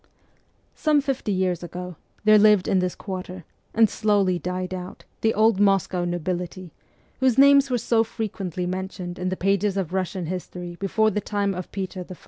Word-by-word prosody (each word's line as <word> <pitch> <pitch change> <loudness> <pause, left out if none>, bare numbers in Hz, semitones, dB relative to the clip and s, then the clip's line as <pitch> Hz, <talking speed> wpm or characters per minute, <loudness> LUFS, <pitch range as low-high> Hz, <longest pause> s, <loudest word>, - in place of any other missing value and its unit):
Some 305 -2 +2
fifty 270 -6 -2
years 185 -2 0
ago, 180 0 -7 0.3
there 215 0 +6
lived 210 -3 +5
in 190 - +3
this 180 -1 -1
quarter, 185 -2 -7 0.3
and 225 0 +5
slowly 200 -4 +1
died 180 +1 -4
out, 180 0 -8 0.2
the 225 - +3
old 215 -1 +3
Moscow 195 -3 +2
nobility, 175 0 -4 0.5
whose 260 -2 +2
names 280 0 +6
were 250 - +1
so 225 0 +2
frequently 195 -5 -4
mentioned 185 -1 -5
in 180 0 -1
the 185 - -3
pages 200 +1 +1
of 190 -5 -1
Eussian 185 -1 -2
history 180 0 -6
before 215 +2 +2
the 210 - -1
time 200 -1 -1
of 180 -1 -7
Peter 190 -2 -4
I. 185 - -7
190 Hz, 170 wpm, -24 LUFS, 180-215 Hz, 0.5 s, there